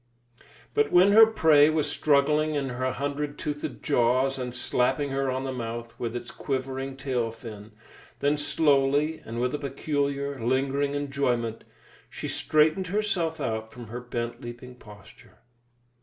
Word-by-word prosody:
But 440 Hz, 0 st, +2 dB
when 185 Hz, +3 st, +6 dB
her 220 Hz, +2 st, +9 dB
prey 155 Hz, -9 st, +5 dB
was 155 Hz, -1 st, +1 dB
struggling 150 Hz, +1 st, +2 dB
in 140 Hz, -2 st, -1 dB
her 130 Hz, +1 st, -2 dB
hundred 145 Hz, +2 st, -3 dB
toothed 145 Hz, -1 st, -5 dB
jaws 130 Hz, 0 st, +2 dB
and 125 Hz, -1 st, -3 dB
slapping 130 Hz, +3 st, +1 dB
her 135 Hz, 0 st, 0 dB
on 130 Hz, +1 st, -2 dB
the 135 Hz, -, -3 dB
mouth 115 Hz, -1 st, -5 dB
with 115 Hz, 0 st, -3 dB
its 120 Hz, 0 st, -5 dB
quivering 135 Hz, 0 st, -4 dB
tail 130 Hz, -4 st, -1 dB
fin, 110 Hz, -2 st, -10 dB, 0.5 s
then 145 Hz, +1 st, +2 dB
slowly, 145 Hz, +1 st, +2 dB
and 115 Hz, +1 st, -6 dB
with 125 Hz, +2 st, 0 dB
a 150 Hz, -, -2 dB
peculiar, 140 Hz, 0 st, -2 dB
lingering 135 Hz, +3 st, 0 dB
enjoyment, 125 Hz, -5 st, -1 dB, 0.4 s
she -, -, -6 dB
straightened 155 Hz, +5 st, +2 dB
herself 180 Hz, -5 st, -1 dB
out 110 Hz, -4 st, -3 dB
from 120 Hz, -3 st, -10 dB
her 120 Hz, +2 st, -5 dB
bent 120 Hz, -1 st, -4 dB
leaping 120 Hz, +1 st, -9 dB
posture. 105 Hz, -5 st, -16 dB
135 Hz, 145 wpm, -26 LUFS, 125-145 Hz, 0.5 s, her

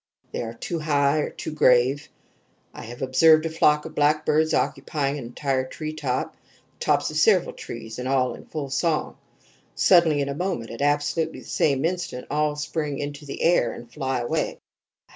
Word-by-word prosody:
They -, -, -3 dB
are 115 Hz, 0 st, -6 dB
too 165 Hz, +8 st, -4 dB
high 145 Hz, -1 st, +2 dB
or -, -, -1 dB
too -, -, -7 dB
grave. 135 Hz, -1 st, +3 dB, 0.6 s
I -, -, -9 dB
have 120 Hz, +3 st, -7 dB
observed 155 Hz, +5 st, +5 dB
a 165 Hz, -, -2 dB
flock 150 Hz, -2 st, +3 dB
of 160 Hz, -, -8 dB
blackbirds 155 Hz, +1 st, +2 dB
occupying 145 Hz, -1 st, -1 dB
an 125 Hz, -, -7 dB
entire 130 Hz, +2 st, -1 dB
treetop 140 Hz, -1 st, -3 dB
the -, -, -35 dB, 0.4 s
tops -, -, +1 dB
of -, -, -4 dB
several -, -, +4 dB
trees 110 Hz, +2 st, -8 dB
and 125 Hz, -, -3 dB
all 130 Hz, -2 st, +1 dB
in -, -, -12 dB
full 140 Hz, -3 st, -5 dB
song. 155 Hz, +3 st, 0 dB, 0.6 s
Suddenly 170 Hz, -5 st, +4 dB
in 140 Hz, -, 0 dB
a -, -, -2 dB
moment 155 Hz, -8 st, -3 dB
at 115 Hz, -, -7 dB
absolutely 145 Hz, +3 st, 0 dB
the -, -, -15 dB
same 140 Hz, -1 st, +1 dB
instant 175 Hz, -7 st, -3 dB
all 150 Hz, 0 st, +1 dB
spring 150 Hz, -1 st, -3 dB
into 145 Hz, 0 st, -6 dB
the 140 Hz, -, -5 dB
air 165 Hz, -9 st, +3 dB
and 120 Hz, 0 st, -12 dB
fly 135 Hz, -4 st, -2 dB
away. 120 Hz, -, -2 dB
145 Hz, 180 wpm, -24 LUFS, 130-155 Hz, 0.6 s, observed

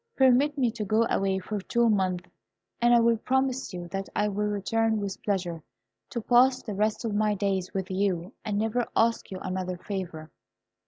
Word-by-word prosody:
Permit 265 Hz, +3 st, +4 dB
me 250 Hz, -4 st, +2 dB
to 220 Hz, -2 st, -4 dB
go 215 Hz, +3 st, +2 dB
away 195 Hz, -1 st, +1 dB
for 200 Hz, +2 st, -4 dB
two 235 Hz, +4 st, +2 dB
months, 185 Hz, -4 st, +1 dB, 0.5 s
and 240 Hz, 0 st, +5 dB
I 235 Hz, -1 st, +5 dB
promise 265 Hz, +2 st, 0 dB
you 175 Hz, -2 st, -6 dB
that 195 Hz, +2 st, -4 dB
I 210 Hz, 0 st, +2 dB
will 210 Hz, +1 st, -1 dB
return 220 Hz, +2 st, 0 dB
with 200 Hz, -2 st, -4 dB
pleasure 180 Hz, -5 st, -2 dB, 0.5 s
to 235 Hz, -, -3 dB
pass 250 Hz, +3 st, +4 dB
the 210 Hz, -, -5 dB
rest 215 Hz, +4 st, 0 dB
of 220 Hz, -, -1 dB
my 210 Hz, 0 st, +2 dB
days 190 Hz, -2 st, -1 dB
with 190 Hz, -1 st, -2 dB
you, 185 Hz, 0 st, -1 dB
and 210 Hz, -2 st, -2 dB
never 225 Hz, +3 st, 0 dB
ask 230 Hz, 0 st, +2 dB
you 190 Hz, -, -5 dB
another 185 Hz, -1 st, -3 dB
favour." 180 Hz, -5 st, -6 dB
210 Hz, 180 wpm, -27 LUFS, 190-230 Hz, 0.5 s, and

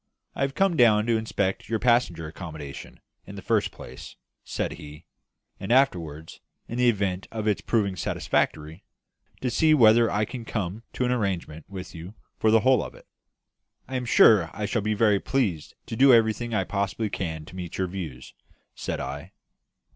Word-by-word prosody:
"I -, -, -6 dB
have 135 Hz, 0 st, 0 dB
come 195 Hz, -3 st, +2 dB
down 110 Hz, -6 st, +5 dB
to 115 Hz, 0 st, +2 dB
inspect 100 Hz, -3 st, -2 dB
your 115 Hz, -, +1 dB
passenger 115 Hz, -9 st, +2 dB
accommodation, 80 Hz, -4 st, -9 dB, 0.3 s
in -, -, -9 dB
the -, -, -9 dB
first -, -, +1 dB
place," -, -, -11 dB, 0.3 s
said -, -, -3 dB
he; 75 Hz, +2 st, -11 dB, 0.5 s
"and 95 Hz, -, -4 dB
afterwards 85 Hz, -, +1 dB, 0.3 s
in 120 Hz, -, -5 dB
the 125 Hz, -1 st, +5 dB
event 95 Hz, -4 st, -1 dB
of 110 Hz, -1 st, -4 dB
its 105 Hz, -, +1 dB
proving 100 Hz, -5 st, 0 dB
satisfactory 80 Hz, -3 st, -2 dB, 0.6 s
to 125 Hz, -, -1 dB
see 155 Hz, +5 st, +4 dB
whether 115 Hz, -3 st, +6 dB
I 105 Hz, +1 st, 0 dB
can 120 Hz, +2 st, -7 dB
come 105 Hz, -2 st, -4 dB
to 125 Hz, -, -1 dB
an 125 Hz, -, 0 dB
arrangement 95 Hz, -9 st, -3 dB
with 95 Hz, -2 st, -8 dB
you 85 Hz, +5 st, -9 dB, 0.2 s
for 110 Hz, -, +3 dB
the 110 Hz, 0 st, +5 dB
whole 130 Hz, 0 st, +4 dB
of -, -, -9 dB
it." -, -, -17 dB, 0.8 s
"I 130 Hz, -, -5 dB
am 125 Hz, -1 st, -2 dB
sure 105 Hz, -7 st, +6 dB
I 105 Hz, -, -3 dB
shall 105 Hz, +2 st, -1 dB
be 105 Hz, +1 st, -1 dB
very 105 Hz, -2 st, +3 dB
pleased 100 Hz, -, -1 dB
to -, -, -5 dB
do 135 Hz, +3 st, +6 dB
everything 115 Hz, 0 st, +3 dB
I 100 Hz, -4 st, +1 dB
possibly 100 Hz, +2 st, -2 dB
can 80 Hz, -5 st, -4 dB
to 90 Hz, -, -13 dB
meet 90 Hz, -2 st, -6 dB
your 95 Hz, -, 0 dB
views," 85 Hz, -8 st, -7 dB, 0.4 s
said -, -, -4 dB
I. -, -, -6 dB
105 Hz, 180 wpm, -26 LUFS, 90-120 Hz, 0.8 s, whether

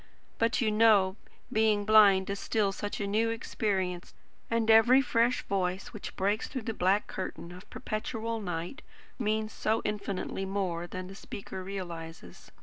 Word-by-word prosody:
But, 230 Hz, +2 st, +2 dB
you 220 Hz, -3 st, +2 dB
know, 210 Hz, -3 st, +4 dB, 0.4 s
being 215 Hz, -2 st, +2 dB
blind 205 Hz, -3 st, +6 dB
is 200 Hz, -, -3 dB
still 210 Hz, -3 st, +1 dB
such 205 Hz, +1 st, -5 dB
a 205 Hz, -, -1 dB
new 215 Hz, +3 st, +1 dB
experience, 190 Hz, -5 st, -2 dB, 0.3 s
and 230 Hz, -1 st, +2 dB
every 235 Hz, +4 st, +7 dB
fresh 245 Hz, -1 st, +1 dB
voice 185 Hz, -1 st, -2 dB
which 215 Hz, -, -7 dB
breaks 200 Hz, +3 st, 0 dB
through 260 Hz, -4 st, -5 dB
the 225 Hz, -, -3 dB
black 195 Hz, +2 st, +2 dB
curtain 185 Hz, -2 st, -6 dB
of 180 Hz, +2 st, -12 dB
perpetual 225 Hz, +1 st, -4 dB
night, 175 Hz, -, -4 dB, 0.4 s
means 215 Hz, -1 st, -1 dB
so 220 Hz, +1 st, 0 dB
infinitely 200 Hz, -2 st, -3 dB
more 185 Hz, -3 st, -2 dB
than 185 Hz, +1 st, -6 dB
the 190 Hz, -, -9 dB
speaker 195 Hz, -1 st, -8 dB
realises. 165 Hz, -, -8 dB
205 Hz, 150 wpm, -30 LUFS, 185-220 Hz, 0.4 s, every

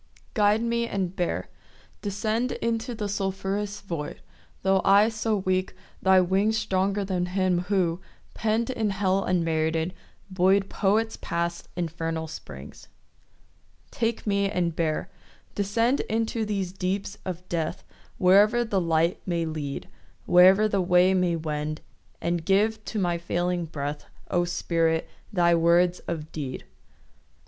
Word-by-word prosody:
Guide 210 Hz, +2 st, +3 dB
me 235 Hz, 0 st, 0 dB
and 190 Hz, -4 st, -2 dB
bear. 175 Hz, -, -2 dB, 0.5 s
Descend 215 Hz, +5 st, -1 dB
Into 230 Hz, +1 st, -2 dB
the 210 Hz, -2 st, -3 dB
sulphurous 200 Hz, +1 st, -2 dB
void— 165 Hz, -6 st, -5 dB, 0.4 s
Tho' 190 Hz, 0 st, +3 dB
I 205 Hz, +3 st, +6 dB
so 220 Hz, -1 st, -1 dB
weak, 185 Hz, -1 st, -1 dB, 0.3 s
thy 190 Hz, 0 st, +5 dB
wings 195 Hz, +5 st, +2 dB
Stronger 200 Hz, -1 st, 0 dB
than 180 Hz, -2 st, -1 dB
him 185 Hz, -1 st, +1 dB
who, 180 Hz, -3 st, +1 dB, 0.3 s
pen'd 225 Hz, +3 st, 0 dB
In 225 Hz, -4 st, -1 dB
hell 195 Hz, 0 st, +1 dB
unmerited, 165 Hz, -1 st, 0 dB, 0.4 s
buoy'd 190 Hz, +2 st, +3 dB
Poets 220 Hz, +3 st, +1 dB
past 170 Hz, 0 st, -2 dB
infernal 165 Hz, -1 st, -3 dB
springs. 75 Hz, -, -10 dB, 1.0 s
Take 230 Hz, 0 st, -1 dB
me 200 Hz, -1 st, +1 dB
and 175 Hz, -4 st, -1 dB
bear. 165 Hz, +2 st, -1 dB, 0.4 s
Descend 230 Hz, +6 st, +1 dB
Into 225 Hz, 0 st, 0 dB
these 195 Hz, -4 st, -2 dB
deeps 195 Hz, +2 st, -3 dB
of 180 Hz, 0 st, -6 dB
death, 165 Hz, -2 st, -2 dB, 0.3 s
Wherever 205 Hz, +6 st, +5 dB
the 200 Hz, -4 st, 0 dB
light 165 Hz, +1 st, +1 dB
may 170 Hz, -2 st, 0 dB
lead, 150 Hz, -3 st, -4 dB, 0.4 s
Wherever 190 Hz, +4 st, +6 dB
the 200 Hz, -2 st, +1 dB
way 180 Hz, +1 st, +4 dB
may 180 Hz, -2 st, +2 dB
wend; 155 Hz, -1 st, -3 dB, 0.4 s
And 170 Hz, -1 st, -1 dB
give 210 Hz, +4 st, +2 dB
to 220 Hz, -, -4 dB
my 175 Hz, -3 st, 0 dB
failing 175 Hz, 0 st, -1 dB
breath, 145 Hz, -1 st, -5 dB, 0.3 s
O 175 Hz, -1 st, +2 dB
Spirit, 165 Hz, -2 st, 0 dB, 0.2 s
thy 175 Hz, -4 st, +3 dB
words 170 Hz, +2 st, +3 dB
of 160 Hz, -2 st, -4 dB
deed. 135 Hz, -5 st, -5 dB
185 Hz, 130 wpm, -26 LUFS, 170-205 Hz, 1.0 s, I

